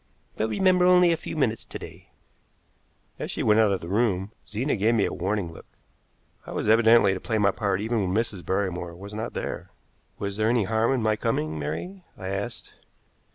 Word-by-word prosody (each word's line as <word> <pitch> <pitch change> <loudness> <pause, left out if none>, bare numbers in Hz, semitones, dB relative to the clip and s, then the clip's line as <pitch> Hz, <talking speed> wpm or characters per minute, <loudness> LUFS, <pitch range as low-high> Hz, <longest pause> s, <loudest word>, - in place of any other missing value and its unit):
"But 110 - -1
remember, 180 - +3
only 180 -1 +6
a - - +3
few 160 - -7
minutes 115 -6 0
to - - -7
day." - - -12 1.1
As - - -4
she - - -3
went 105 +1 +4
out 110 -2 +4
of 95 - -1
the 85 - -7
room, 100 -1 0 0.2
Zena 120 +7 -1
gave 110 +3 +2
me 105 - +3
a - - -3
warning 95 -2 -2
look. - - -13 0.8
I - - -8
was - - -2
evidently 110 -2 +6
to 95 - -4
play 110 +2 -1
my 100 -1 +3
part 100 -1 -1
even 110 +1 0
when - - -1
Mrs. 110 -6 -2
Barrymore 90 -1 -2
was 100 +3 -10
not 110 +2 -5
there. - - -4 0.5
"Was 100 0 -4
there 110 +1 +2
any 120 -2 +3
harm 110 +4 +1
in 130 -4 0
my 110 -1 +2
coming, 80 -9 -1
Mary?" 180 - -5
I 95 - -5
asked. 100 +4 -5
110 Hz, 200 wpm, -26 LUFS, 95-115 Hz, 1.1 s, only